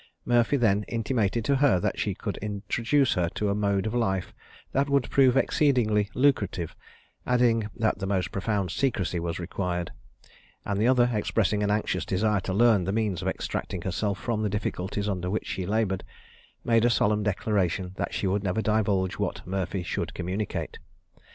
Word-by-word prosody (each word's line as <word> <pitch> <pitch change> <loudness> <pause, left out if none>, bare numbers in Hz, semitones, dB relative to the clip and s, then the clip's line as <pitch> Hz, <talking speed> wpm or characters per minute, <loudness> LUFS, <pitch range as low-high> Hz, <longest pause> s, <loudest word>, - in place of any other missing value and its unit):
Murphy 120 +3 +3
then 105 -5 +3
intimated 115 -1 0
to 140 +1 +3
her 135 -9 +4
that - - -2
she - - -1
could - - -4
introduce 115 +6 0
her 90 -3 0
to 105 - 0
a - - +2
mode 100 -1 0
of 110 - -2
life 95 -6 -1 0.4
that 140 +1 +1
would 140 -2 +2
prove 135 -2 +5
exceedingly 120 -9 +2
lucrative, 105 - +1 0.5
adding, 120 -3 +2
that 110 -4 0
the 95 - -3
most 95 -2 0
profound 100 -2 -1
secrecy 95 - 0
was 85 -1 -3
required; 90 0 -3 0.7
and 100 0 -1
the 115 - +3
other, 125 -1 +4
expressing 105 -1 +1
an 105 - +1
anxious 105 +1 0
desire 105 +2 +1
to 95 - -4
learn 105 -2 +4
the 95 - -1
means 105 -5 -1
of 95 - -3
extricating 90 -1 -3
herself 100 +1 -1
from 115 -1 -2
the 105 - 0
difficulties 100 0 -2
under 90 -3 -2
which 105 - -2
she 90 -2 -4
laboured, 100 -3 0 0.6
made 115 -1 +3
a 120 - +5
solemn 105 -2 +2
declaration 95 -3 0
that - - -2
she - - -2
would 95 +2 +1
never 100 +3 0
divulge 100 -4 +1
what - - -3
Murphy 95 0 -2
should - - -3
communicate. 95 +4 -3
105 Hz, 175 wpm, -27 LUFS, 95-115 Hz, 0.7 s, prove